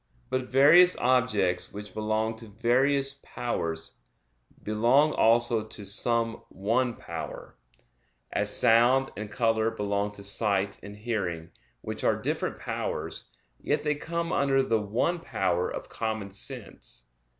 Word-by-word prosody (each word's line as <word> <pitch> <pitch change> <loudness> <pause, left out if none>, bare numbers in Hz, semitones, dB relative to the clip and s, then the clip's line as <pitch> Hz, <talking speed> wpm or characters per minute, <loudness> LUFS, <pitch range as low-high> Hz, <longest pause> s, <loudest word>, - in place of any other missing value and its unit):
But 130 0 -2
various 155 +7 +6
objects 105 -8 +1
which 105 0 -8
belong 110 +1 -1
to 115 0 -9
various 135 +5 +1
powers, 85 -9 -4 0.7
belong 120 +8 +3
also 115 0 +3
to 110 -1 -8
some 115 +3 -1
one 115 +5 0
power; - - -8 0.8
as - - 0
sound 120 +4 +5
and 105 0 -6
color 115 +1 +1
belong 100 -1 -2
to 100 - -9
sight 100 -1 +1
and 100 0 -10
hearing, 95 -7 -3 0.3
which - - -5
are - - +3
different - - -2
powers, - - -4 0.3
yet 150 0 -1
they 150 -1 +1
come 170 +3 -3
under 135 -1 +2
the 115 -4 +1
one 120 - 0
power 95 - -1
of - - -6
common 110 -3 -4
sense. - - -6
115 Hz, 130 wpm, -27 LUFS, 100-130 Hz, 0.8 s, various